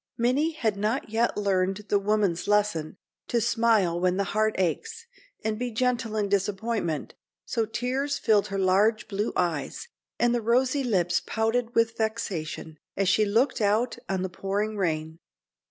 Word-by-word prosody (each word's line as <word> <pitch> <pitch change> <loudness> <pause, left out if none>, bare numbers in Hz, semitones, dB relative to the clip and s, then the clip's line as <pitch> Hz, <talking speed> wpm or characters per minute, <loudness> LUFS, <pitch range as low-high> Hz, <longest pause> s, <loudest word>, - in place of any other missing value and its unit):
Minnie 270 +7 +1
had 220 -9 -1
not 215 +3 -1
yet 230 +1 +1
learned 195 0 0
the 205 - +3
woman's 200 -4 0
lesson, 205 -6 +1 0.3
to 235 - +1
smile 220 -6 +2
when 180 +1 +1
the 200 - +2
heart 215 0 +2
aches, 450 - -2 0.4
and 215 0 -1
be 250 0 -1
gentle 235 -1 -1
in 205 -1 +1
disappointment, 200 -4 -1 0.3
so 225 -3 -1
tears 265 +5 -1
filled 210 -3 +3
her 195 - -4
large 200 +4 +2
blue 205 +1 -2
eyes, 175 - -2 0.3
and 240 0 +2
the 240 - 0
rosy 255 +5 +2
lips 180 -7 +1
pouted 230 +2 -1
with 230 0 +2
vexation, 170 -8 -3 0.2
as 195 -1 +2
she 215 +2 +4
looked 230 +5 +1
out 220 +4 +1
on 190 -1 -1
the 190 - -2
pouring 205 +4 -2
rain. 160 -4 -2
215 Hz, 155 wpm, -26 LUFS, 190-235 Hz, 0.4 s, she